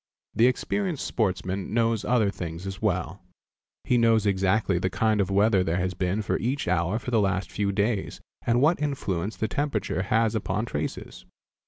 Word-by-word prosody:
The 115 - +4
experienced 175 +5 -1
sportsman 95 -1 -2
knows 115 -2 +1
other 115 -5 +2
things 85 -1 -6
as 95 +1 -6
well. 90 -3 -1 0.6
He 125 - +2
knows 115 -2 +3
exactly 95 -1 +2
the 95 - 0
kind 110 +2 +1
of 95 - -1
weather 100 0 +3
there 85 -1 0
has 90 0 -1
been 95 +4 -1 0.2
each 130 +5 -2
hour 90 +3 +1
for 125 +2 -5
the 115 -3 +3
last 95 -2 -1
few 100 -1 0
days 100 0 -1 0.2
and 120 +1 +2
what 155 +3 +3
influence 110 - -2
the 110 - -1
temperature 115 -5 -1
has 110 +3 +1
upon 105 0 -1
traces. 75 -9 -5
105 Hz, 170 wpm, -26 LUFS, 95-115 Hz, 0.6 s, The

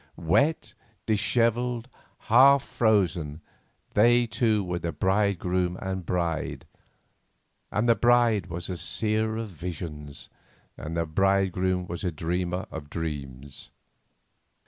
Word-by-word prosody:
Wet, 140 - +1 0.3
dishevelled, 115 +2 +1 0.3
half 135 +4 +6
frozen, 90 - 0 0.5
they 120 +3 +5
two 110 -2 +1
were 90 -1 -3
the 85 0 -3
bride 100 +2 +1
groom 90 0 -1
and 95 0 -3
the 90 - -11
bride, 85 -3 -2 1.1
and 110 +3 0
the 115 - +6
bride 120 -3 +3
was 85 0 -6
a 90 - -4
seer 110 +3 -1
of 115 -1 -4
visions, 80 -4 -7 0.5
and 80 +2 -6
the 85 - 0
bridegroom 95 +1 +1
was 85 +1 -6
a 90 - 0
dreamer 90 +3 -2
of 75 -2 -8
dreams. 70 -5 -6
95 Hz, 120 wpm, -26 LUFS, 85-110 Hz, 1.1 s, half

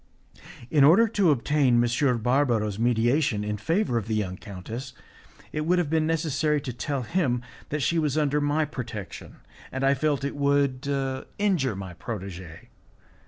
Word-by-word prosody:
In 150 -3 +5
order 180 +11 +6
to 200 -5 +2
obtain 140 -1 +2
M. 120 +2 +2
Barbaro's 120 -6 +1
mediation 120 0 +2
in 105 0 -2
favour 160 - 0
of 110 - -8
the 110 - -1
young 95 -4 -2
countess, 110 +7 -8 0.6
it 155 - -2
would 175 +4 +2
have 170 -4 0
been 160 -1 +2
necessary 155 -2 +1
to 130 -3 -5
tell 135 +2 -3
him 125 - 0 0.3
that 150 -1 -2
she 165 +4 +2
was 150 -2 0
under 150 -1 +1
my 145 +2 +1
protection, 120 - -7 0.4
and 130 +1 -3
I 135 +1 +4
felt 140 0 0
it 140 - -3
would 140 -2 +1 0.5
injure 175 - +1
my 95 -2 -7
protegee. 95 -4 -8
135 Hz, 160 wpm, -26 LUFS, 115-150 Hz, 0.6 s, order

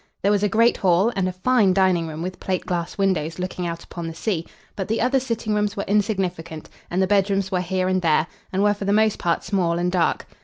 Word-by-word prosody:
There 200 - +3
was 205 -1 +2
a 210 - +2
great 230 +3 +3
hall, 190 +4 +2
and 190 -1 0
a - - -1
fine 195 0 +2
dining 185 -4 +2
room 160 +1 -6
with 185 +1 -5
plate 185 -1 -2
glass 170 -2 -3
windows 175 -5 0
looking 180 -1 -3
out 170 0 -5
upon 170 -1 -7
the 165 - -6
sea; 170 -3 -2 0.3
but 195 - -4
the 225 - -1
other 255 +3 +2
sitting 230 -4 -2
rooms 210 0 0
were 200 - -2
insignificant, 185 -6 -1 0.2
and 185 +2 +1
the - - +3
bedrooms 195 0 +1
were 180 -1 +1
here 185 +1 -1
and 185 0 +1
there, 160 -2 +3 0.3
and 190 +1 +1
were 205 0 +4
for 200 -1 -6
the 200 - +2
most 215 0 +2
part 170 -1 0
small 175 -4 0
and 175 +1 0
dark. 180 -2 +1
190 Hz, 240 wpm, -23 LUFS, 175-205 Hz, 0.3 s, were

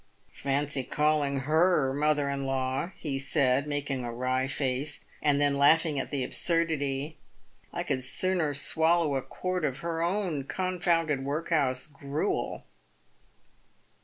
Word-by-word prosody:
* - - -36
Fancy 140 0 -1
calling 150 -1 +1
her 155 -1 +3
mother 145 0 +1
in 140 0 -2
law," 130 +2 -1
he 140 -6 -3
said, 140 0 +2
making 145 -3 -2
a. 120 - -4
wry 130 +2 -1
face, 135 +2 -2 0.2
and 145 -1 +3
then 145 -1 +2
laughing 155 0 +4
at - - -4
the 140 -3 -2
absurdity. 155 -3 0 0.2
" - - -35
I - - -3
could 130 - -1
sooner 160 +2 0
swallow 160 +2 +2
a 135 - 0
quart 180 +7 -3
of 135 -4 -2
her 165 -1 -1
own 175 -5 -1
confounded 170 -5 0
workhouse 140 -3 0
gruel." 145 +5 -3
145 Hz, 135 wpm, -28 LUFS, 135-160 Hz, 0.2 s, laughing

